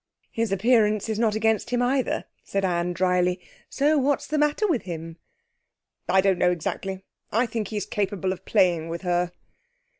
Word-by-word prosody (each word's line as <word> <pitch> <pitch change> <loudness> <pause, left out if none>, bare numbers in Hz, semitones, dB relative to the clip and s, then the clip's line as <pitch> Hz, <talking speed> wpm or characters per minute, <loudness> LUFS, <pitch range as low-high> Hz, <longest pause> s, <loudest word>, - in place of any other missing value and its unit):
'His 225 -2 -1
appearance 215 0 +2
is 220 -1 -1
not 220 -2 +2
against 220 -1 +1
him 245 0 0
either,' 255 +1 0 0.2
said 195 -1 -1
Anne 175 -1 0
dryly; 180 0 +1 0.3
'so 295 +2 +2
what's 275 +1 +1
the 305 +1 -1
matter 295 +7 +2
with 320 - +1
him?' 165 -2 -7 0.9
'I 190 - +5
don't 190 -2 +2
know 180 - +4
exactly. 190 +2 -3 0.3
I 230 +4 +2
think 225 -3 -3
he's 205 -2 -3
capable 200 -3 -1
of 190 0 -12
playing 170 -4 +2
with 170 +2 -5
her.' 175 -1 0
195 Hz, 170 wpm, -25 LUFS, 180-230 Hz, 0.9 s, I